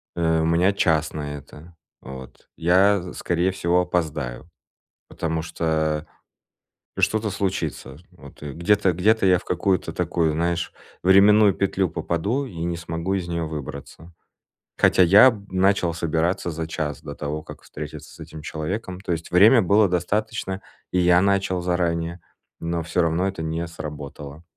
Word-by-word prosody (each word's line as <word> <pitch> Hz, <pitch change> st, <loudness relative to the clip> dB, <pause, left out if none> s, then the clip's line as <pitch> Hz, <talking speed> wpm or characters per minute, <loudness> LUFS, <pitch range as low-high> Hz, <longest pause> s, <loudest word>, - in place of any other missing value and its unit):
Э, 80 Hz, -1 st, +1 dB
у -, -, +1 dB
меня 85 Hz, +4 st, +3 dB
час 80 Hz, -5 st, +1 dB
на 75 Hz, -1 st, -5 dB
это, 75 Hz, +4 st, -14 dB, 0.3 s
вот. 65 Hz, -1 st, -11 dB
Я, 90 Hz, +2 st, +2 dB
скорее 85 Hz, +2 st, 0 dB
всего, 90 Hz, -1 st, +1 dB
опоздаю, 80 Hz, -6 st, -3 dB, 0.6 s
потому 80 Hz, 0 st, -3 dB
что 80 Hz, -2 st, -1 dB, 1.0 s
что-то 110 Hz, -1 st, +1 dB
случится, 90 Hz, -8 st, -3 dB
вот. 70 Hz, -6 st, -16 dB
Где-то 90 Hz, +6 st, +1 dB
где-то 105 Hz, +5 st, +2 dB
я 90 Hz, -2 st, +5 dB
в -, -, -12 dB
какую-то 90 Hz, +1 st, 0 dB
такую, 80 Hz, -3 st, 0 dB
знаешь, 85 Hz, +1 st, -1 dB, 0.3 s
временную 100 Hz, +2 st, +6 dB
петлю 95 Hz, -1 st, 0 dB
попаду 85 Hz, -, -2 dB
и 85 Hz, -10 st, -6 dB
не 85 Hz, -1 st, -2 dB
смогу 85 Hz, +2 st, -3 dB
из 90 Hz, -3 st, -3 dB
неё 85 Hz, -1 st, -2 dB
выбраться. 75 Hz, +2 st, -8 dB, 0.7 s
Хотя 90 Hz, -, +5 dB
я, 100 Hz, +8 st, +8 dB
м, 105 Hz, -4 st, -7 dB
начал 95 Hz, -2 st, +2 dB
собираться 85 Hz, +1 st, -1 dB
за 80 Hz, 0 st, -4 dB
час 75 Hz, -4 st, -4 dB
до 70 Hz, -, -8 dB
того, 75 Hz, +1 st, -4 dB
как -, -, -12 dB
встретиться 75 Hz, 0 st, -9 dB
с 85 Hz, -, -17 dB
этим 80 Hz, -1 st, -9 dB
человеком. 90 Hz, +5 st, -5 dB
То 90 Hz, -3 st, -2 dB
есть 80 Hz, +1 st, -6 dB
время 110 Hz, +7 st, +7 dB
было 100 Hz, +3 st, +4 dB
достаточно, 95 Hz, +2 st, -2 dB, 0.3 s
и 90 Hz, -, 0 dB
я 90 Hz, 0 st, +5 dB
начал 95 Hz, -2 st, +1 dB
заранее, 85 Hz, -1 st, -1 dB, 0.4 s
но 85 Hz, 0 st, -2 dB
всё 85 Hz, +2 st, 0 dB
равно 85 Hz, +3 st, +1 dB
это 95 Hz, -4 st, -3 dB
не 80 Hz, +1 st, -2 dB
сработало. 75 Hz, -1 st, -8 dB
85 Hz, 150 wpm, -23 LUFS, 80-95 Hz, 1.0 s, я